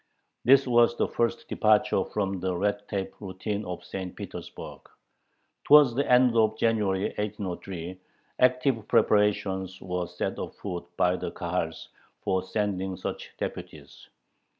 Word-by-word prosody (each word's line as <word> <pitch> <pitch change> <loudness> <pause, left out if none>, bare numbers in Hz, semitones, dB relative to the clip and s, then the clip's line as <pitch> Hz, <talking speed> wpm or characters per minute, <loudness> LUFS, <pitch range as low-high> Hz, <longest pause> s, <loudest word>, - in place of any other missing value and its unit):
This 135 +2 +6
was 120 -1 +4
the - - +1
first 115 0 -1
departure 105 -3 +3
from 100 -2 -2
the 90 -1 -1
red 100 +2 -1
tape 95 -2 -3
routine 100 +2 -4
of 90 -1 -6
St. 90 0 -6
Petersburg. - - -8 0.9
Towards 145 -4 +7
the 140 +1 0
end 125 -1 +5
of 110 -1 +3
January, 105 -4 +1 0.2
1803, 95 -3 -5 0.4
active 125 -3 +2
preparations 95 -3 +2
were 90 -1 -3
set 90 +1 -4
afoot 90 -3 -6
by 90 0 +3
the - - -4
Kahals - - -3 0.3
for 95 -1 +1
sending 95 -2 -2
such - - -5
deputies. - - -7
100 Hz, 125 wpm, -27 LUFS, 95-115 Hz, 0.9 s, Towards